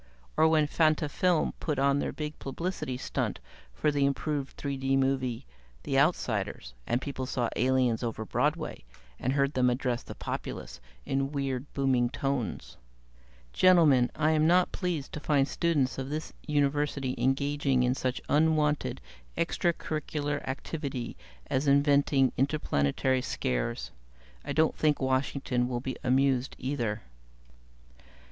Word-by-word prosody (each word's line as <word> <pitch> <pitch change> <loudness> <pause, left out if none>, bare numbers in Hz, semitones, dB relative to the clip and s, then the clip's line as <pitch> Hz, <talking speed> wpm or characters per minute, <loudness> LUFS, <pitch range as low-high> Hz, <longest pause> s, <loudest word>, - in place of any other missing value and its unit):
Or 160 - +5
when 155 -1 +4
Fantafilm 155 +2 +2
put 150 -4 -2
on 140 +1 +3
their - - -1
big 150 0 -6
publicity 140 -2 -4
stunt - - -2 0.3
for 150 - 0
the 145 -1 +1
improved 140 0 -1
3 140 -1 -3
D 135 0 +1
movie, 130 -2 0 0.4
'The - - +1
Outsiders', - - 0
and 120 - +1
people 130 -2 -4
saw 125 -3 -1
the - - -3
aliens 125 -3 +2
over 115 -2 -3
Broadway - - -1 0.4
and 130 - 0
heard 140 0 +1
them 125 -1 +3
address 125 -1 -1
the - - -9
populace - - -6 0.2
in 135 +1 -1
weird, 135 -1 -3
booming 130 -3 +2
tones. 135 -4 -3 0.8
"Gentlemen, 155 -9 +5
I 155 - +2
am 155 0 +3
not 180 +1 +4
pleased 175 -7 -3
to - - -4
find 145 -2 +2
students 145 -4 0
of 135 0 -4
this 155 +2 -4
University 145 -2 0
engaging 135 0 +1
in 125 0 +2
such 130 -1 -2
unwanted 150 -1 +2 0.4
extra 170 +1 +1
curricular 150 -3 -3
activity 135 -2 -4 0.3
as 135 +2 -1
inventing 140 -1 +4
interplanetary 130 - +1
scares. - - -2 0.5
I - - -5
don't 160 0 +3
think 150 -2 +2
Washington 130 -1 0
will 120 -1 -1
be 130 +1 -4
amused, 130 0 +2
either." 120 -5 -2
140 Hz, 135 wpm, -29 LUFS, 130-150 Hz, 0.8 s, Or